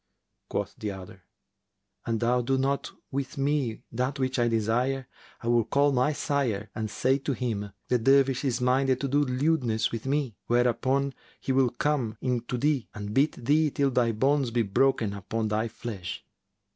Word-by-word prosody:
Quoth 100 -1 -2
the 110 -3 -3
other, 95 -1 -9 0.8
"An 115 -1 +1
thou 120 +2 +2
do 135 +3 +1
not 135 +1 0 0.2
with 135 0 -3
me 140 -5 0
that 130 +4 -1
which 130 -1 -1
I 120 - +3
desire, 120 +4 0 0.3
I 115 - -6
will 120 -1 +4
call 140 +4 +3
my 130 +2 +2
sire 120 -9 -1
and 110 -1 -3
say 135 +5 +1
to 140 0 -2
him, 110 -5 -3 0.2
The 125 - +2
Dervish 135 +2 +3
is 130 -3 0
minded 130 +1 +2
to 140 - 0
do 145 +2 +2
lewdness 125 -4 +1
with 115 +2 -5
me. 140 -5 -1
Whereupon 130 +3 +2 0.3
he - - -2
will 130 -1 +4
come 125 -4 -1
in 125 -2 0
to 125 - -3
thee 140 -1 0
and 105 0 -5
beat 135 -1 +1
thee 150 +3 +4
till 140 -1 +1
thy 120 -2 +2
bones 135 +4 +2
be 115 0 +1
broken 110 +1 +2
upon 110 +3 -3
thy 110 +2 0
flesh." 110 -5 -6
125 Hz, 175 wpm, -27 LUFS, 115-135 Hz, 0.8 s, will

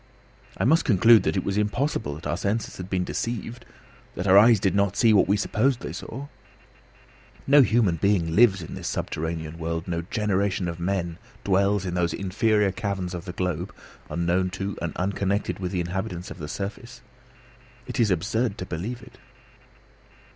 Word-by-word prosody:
I - - -1
must 160 +8 +4
conclude 115 +1 +6
that - - -1
it 95 - 0
was 100 +1 -1
impossible 105 - -1
that 80 - -11
our 75 +3 -1
senses 105 +5 -2
had 90 0 -7
been 95 -1 0
deceived, 120 +4 -4 0.5
that 90 - -4
our 95 -1 +5
eyes 110 +2 +7
did 95 - +1
not 100 -1 +1
see 115 -3 +5
what 100 - +4
we 100 +2 +3
supposed 120 +4 +1
they - - -5
saw. 135 +5 -7 1.2
No 145 +1 +7
human 110 -8 +3
being 85 -4 +1
lives 100 -5 +5
in - - -8
this - - -6
subterranean 80 0 -4
world; 80 0 -3
no 85 -1 -2
generation 100 -1 -1
of 85 0 -5
men 85 -2 -2 0.2
dwells 100 0 +2
in 90 - -3
those 90 -1 0
inferior 105 +1 +1
caverns 95 -3 -3
of 90 0 -6
the 90 - -5
globe, 90 +1 -3 0.3
unknown 85 +2 0
to 95 +1 -4
and 85 -2 -3
unconnected 100 +2 -1
with 90 -2 -3
the 90 - -1
inhabitants 90 +1 -4
of 90 - -9
its 75 0 -5
surface. 115 +5 -6 0.8
It 135 - -5
is 115 -3 +4
absurd 105 +5 0
to 90 - -5
believe 110 +9 -5
it! 125 +1 -16
95 Hz, 175 wpm, -25 LUFS, 90-110 Hz, 1.2 s, eyes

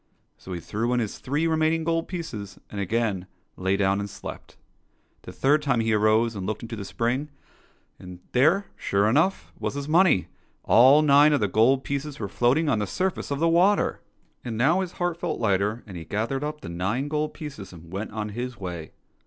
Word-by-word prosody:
So 95 - -12
he 85 - -4
threw 115 +7 -2
in 125 - +2
his 110 -4 -3
three 145 +5 -1
remaining 160 0 +1
gold 165 0 0
pieces, 120 - -6
and 100 - -4
again 100 -2 -1 0.3
lay 95 +1 0
down 100 0 +2
and 100 0 -4
slept. - - -9 0.6
The - - -10
third 145 +3 +2
time 135 -5 +1
he 115 -1 +1
arose 110 +2 +3
and 95 -2 -4
looked 110 +1 -3
into 115 0 -6
the 105 - -6
spring, 120 +8 -2 0.7
and 90 -1 -10
there, 155 +11 +3
sure 100 +1 +1
enough, 160 - +1
was - - -3
his 140 0 -4
money: 160 - +4 0.4
all 135 +6 +6
nine 145 +1 +6
of 145 - +3
the 105 - +1
gold 125 +7 +3
pieces 140 +1 -4
were 105 - -3
float 120 +7 +2
ing 160 0 0
on 130 -7 +2
the 105 - -2
surface 185 - -2
of 140 - -1
the 165 +3 +2
water! 180 +5 +3 0.4
And 115 -2 -4
now 160 +11 +3
his 180 -2 -5
heart 175 -2 -2
felt 175 -2 -3
lighter, 105 +1 0
and 100 -4 -10
he 85 - -6
gathered 115 - -2
up 150 0 -4
the - - -7
nine 95 +11 -2
gold 150 +1 -2
pieces 140 -11 -8
and 85 0 -13
went 100 +3 -4
on 105 0 -4
his 120 +2 -5
way. 85 -4 -6
120 Hz, 205 wpm, -25 LUFS, 100-150 Hz, 0.7 s, all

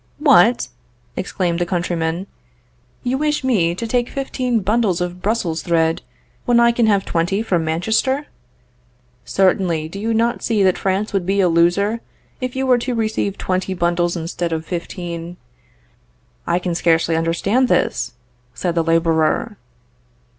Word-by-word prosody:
What! - - +4 0.5
exclaimed 175 -2 -1
the 175 - +1
countryman, 170 0 -1 0.8
you 255 +2 -1
wish 300 -1 0
me 185 -10 +2
to 230 - -4
take 240 +1 0
fifteen 255 -4 -1
bundles 205 -2 +1
of 180 0 -4
Brussels 190 -6 -1
thread, 165 0 +1 0.4
when 240 -1 +4
I 235 0 +5
can 235 -1 +2
have 200 -2 +2
twenty 175 +5 0
from 175 -7 0
Manchester? 220 - 0 1.0
Certainly; 180 -4 +1
do 195 - -7
you 225 +2 -1
not 235 +2 +1
see 215 -4 +1
that 185 -1 +2
France 195 +3 -1
would 190 -3 -1
be 195 +1 +1
a 190 - +4
loser, 175 +7 +2 0.4
if 255 0 -4
you 265 0 -1
were 250 -2 +4
to 245 +1 -2
receive 215 -3 -1
twenty 185 0 -2
bundles 175 0 0
instead 170 +1 -3
of 160 0 -3
fifteen? 175 0 -5 1.1
I 170 - +2
can 180 -1 -2
scarcely 165 -1 +2
understand 175 +10 +1
this, - - 0 0.4
said 175 +5 -1
the 165 -1 +1
laborer. 165 +5 +1
185 Hz, 145 wpm, -19 LUFS, 170-225 Hz, 1.1 s, I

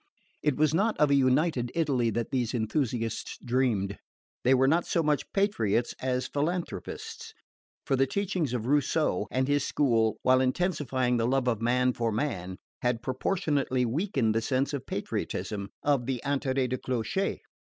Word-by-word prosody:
It 150 -3 +1
was 155 0 +3
not 215 +6 +1
of 150 -1 +3
a - - +5
united 130 -1 +2
Italy 140 -8 +1
that 115 +1 -2
these 125 -2 0
enthusiasts 115 -1 -2
dreamed. 115 -6 0 0.4
They 130 +2 +5
were 130 +1 +4
not 165 +5 +2
so 165 - +1
much 150 -1 0
patriots 120 - +1
as 130 0 0
philanthropists; 165 +6 -4 0.5
for 135 - +2
the 135 +1 +2
teachings 180 -4 -1
of 115 -3 -2
Rousseau 140 - +1
and 130 +1 0
his 145 -1 +2
school, 115 -8 +2
while 130 0 +5
intensifying 130 -4 0
the 115 0 +1
love 130 0 +1
of 115 -3 +1
man 125 +2 +2
for 115 -1 -1
man, 95 -7 -2 0.2
had 120 -1 0
proportionately 135 -2 0
weakened 135 - 0
the 115 - +1
sense 135 +4 0
of 140 - -4
patriotism, 100 -2 -3
of 140 -4 +1
the 130 -2 -1
interets 135 -2 0
du 130 - 0
clocher. 130 +10 -1
130 Hz, 160 wpm, -28 LUFS, 120-145 Hz, 0.5 s, a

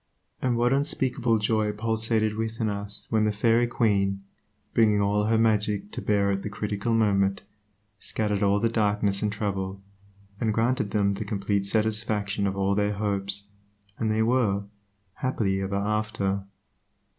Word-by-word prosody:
And 125 -2 +1
what 120 +2 +3
unspeakable 130 -4 +1
joy 105 0 +1
pulsated 110 0 0
within 110 0 -2
us 100 0 -5
when 110 -1 +3
the 105 - +2
Fairy 115 +3 +3
Queen, 100 -4 +1 0.5
bringing 105 -3 +4
all 100 +1 +2
her 110 +1 +2
magic 105 -2 +1
to - - -5
bear 100 -1 +2
at 100 0 -1
the 105 - -4
critical 105 +2 -3
moment, 100 -3 +2 0.6
scattered 105 -2 -1
all 100 0 +3
the 115 - +2
darkness 105 -3 +1
and 105 - 0
trouble, 100 -2 -3 0.6
and 110 -2 0
granted 120 -1 +1
them 100 -1 +1
the 100 +2 -4
complete 100 -1 -1
satisfaction 105 -1 0
of 95 0 -3
all 100 0 +1
their 105 +1 +1
hopes, 100 -1 -2 0.5
and 110 - 0
they 110 +1 +2
were 110 -5 +2 0.5
"happy 100 -7 0
ever 95 +1 -2
after." 100 -1 -1
105 Hz, 150 wpm, -26 LUFS, 100-110 Hz, 0.6 s, bringing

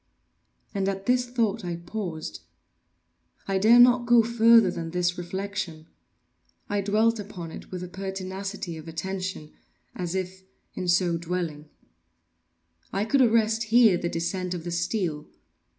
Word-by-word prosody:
And 195 -1 0
at 195 0 -4
this 250 0 +2
thought 230 -3 0
I 175 -1 -3
paused. 170 - -6 1.1
I 195 -1 +1
dared 235 +4 +8
not 245 -1 +4
go 240 -1 +6
farther 230 -3 +5
than 165 -2 -5
this 175 +1 0
reflection. 185 -2 -5 0.8
I 205 0 0
dwelt 215 +3 +2
upon 185 -5 -7
it - - -10
with 180 -1 -6
a - - -5
pertinacity 190 -1 -5
of 155 +1 -10
attention—as 180 0 -6
if, 190 0 -4 0.3
in 185 - -4
so 175 -1 +2
dwelling, 165 -3 -4 1.2
I 200 +2 -1
could 270 +5 +3
arrest 225 -1 +3
here 225 -3 +5
the 175 0 -2
descent 180 +2 -2
of 170 - -6
the 175 - -5
steel. 170 -3 -2
190 Hz, 135 wpm, -26 LUFS, 175-220 Hz, 1.2 s, dared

